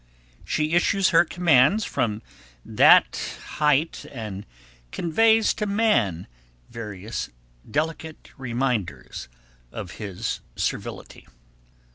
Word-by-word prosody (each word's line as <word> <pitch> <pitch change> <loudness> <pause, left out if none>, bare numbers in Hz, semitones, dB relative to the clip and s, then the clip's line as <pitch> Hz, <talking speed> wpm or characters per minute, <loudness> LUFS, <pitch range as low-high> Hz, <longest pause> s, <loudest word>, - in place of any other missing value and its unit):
She 155 +1 -1
issues 190 +2 +3
her 170 -1 +5
commands 175 - +3
from 110 -1 -2 0.4
that - - +4 0.2
height 150 +1 +2
and 105 -6 -7 0.4
conveys 220 +6 +3
to 210 - -3
man 200 - +1 0.5
various 105 -1 -6 0.4
delicate 160 +1 -3
reminders 125 - -3 0.4
of 90 - -7
his 100 -4 -4 0.2
servility. - - -5
145 Hz, 85 wpm, -24 LUFS, 110-175 Hz, 0.5 s, her